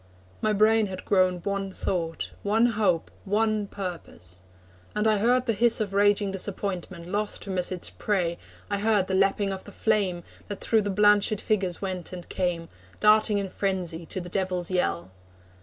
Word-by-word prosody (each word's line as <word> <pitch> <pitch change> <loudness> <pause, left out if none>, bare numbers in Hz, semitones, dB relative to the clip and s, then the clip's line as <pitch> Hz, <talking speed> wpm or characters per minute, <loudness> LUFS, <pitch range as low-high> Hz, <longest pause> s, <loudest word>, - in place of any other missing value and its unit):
My 215 - +2
brain 215 +1 +4
had 185 -1 -7
grown 185 -2 +2
one 200 -1 -2
thought, 165 -3 -3
One 220 +3 +3
hope, 205 -8 +1
one 215 +1 +1
purpose. 170 - -8 0.5
And 210 +1 0
I 215 -2 +3
heard 245 +4 +3
the 230 - +1
hiss 235 +3 +3
Of 205 -3 -2
raging 205 0 +3
disappointment, 185 -2 -4
loth 205 +2 -2
to 195 - -6
miss 180 -1 0
Its 180 -2 -3
prey 180 -5 -1 0.3
I 200 -1 -1
heard 210 -2 +2
the 190 - -3
lapping 195 +1 +2
of 190 - -7
the 205 - -10
flame, 195 -5 0 0.2
That 205 -2 -5
through 220 -1 +2
the 205 - -2
blanched 205 +1 +4
figures 195 -4 -1
went 185 -3 -3
and 175 -1 -8
came, 175 -2 -1 0.3
Darting 215 0 +5
in 200 -1 -2
frenzy 180 -4 -3
to - - -2
the 175 - -7
devils' 180 -1 -2
yell. 95 - 0
195 Hz, 175 wpm, -26 LUFS, 180-210 Hz, 0.5 s, Darting